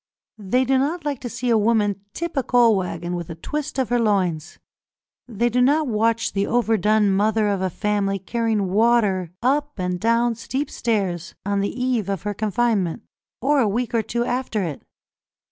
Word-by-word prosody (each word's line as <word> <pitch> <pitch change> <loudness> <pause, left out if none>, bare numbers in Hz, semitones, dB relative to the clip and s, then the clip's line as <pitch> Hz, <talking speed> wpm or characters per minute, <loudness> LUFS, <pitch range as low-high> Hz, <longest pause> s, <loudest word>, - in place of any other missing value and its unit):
They 245 +6 +1
do 265 +1 +2
not 305 +5 -1
like 285 -4 -2
to 245 - -5
see 245 +1 -2
a 225 - +4
woman 210 -2 +1
tip 340 +7 -5
a 270 - +2
coal 240 -3 +4
waggon 175 -2 -3
with 170 -2 -5
a 165 - -6
twist 295 - -5
of 260 -5 0
her 245 - +2
loins; 185 -7 0 0.7
they 235 0 0
do 245 +1 +1
not 295 +5 +3
watch 230 -1 0
the 200 0 0
overdone 215 -3 +2
mother 210 +2 +2
of 200 -2 -1
a 190 - 0
family 200 +1 -1
carrying 210 0 -1
water 210 -4 +2
up 290 +2 0
and 180 -1 -2
down 230 +3 +2
steep 260 +5 -4
stairs 190 -7 -2
on 200 0 0
the 200 +5 -2
eve 245 -6 0
of 195 -4 -3
her 205 0 -2
confinement 210 -3 0 0.4
or 285 +2 +3
a 235 - +3
week 240 +4 -2
or 230 - +3
two 235 +2 -2
after 245 -5 -1
it. 160 -6 -5
220 Hz, 185 wpm, -22 LUFS, 195-245 Hz, 0.7 s, a